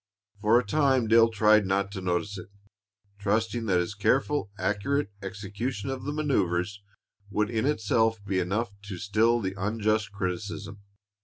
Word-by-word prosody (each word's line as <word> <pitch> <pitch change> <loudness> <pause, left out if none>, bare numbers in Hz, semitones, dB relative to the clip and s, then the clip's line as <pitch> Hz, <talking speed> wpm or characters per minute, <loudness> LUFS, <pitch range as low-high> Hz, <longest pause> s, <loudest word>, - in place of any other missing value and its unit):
For 110 +3 +4
a 125 - -3
time 130 0 +2
Dale 115 +1 +6
tried 110 -2 +4
not 100 +1 0
to 95 -2 -5
notice 90 +3 -1
it, 90 - -8 0.7
trusting 110 +3 0
that 90 -3 +3
his 90 +3 -2
careful, 130 +5 +1
accurate 105 +4 -1
execution 100 +5 -4
of 130 -1 -5
the 145 - -2
manoeuvers 100 - 0 0.5
would 105 +2 0
in 115 +3 0
itself 115 -4 +2
be 95 -1 0
enough 105 +5 -1
to 100 -3 -6
still 110 +4 +2
the 95 -3 -3
unjust 110 +1 0
criticism. 100 +1 -4
105 Hz, 150 wpm, -27 LUFS, 100-115 Hz, 0.7 s, Dale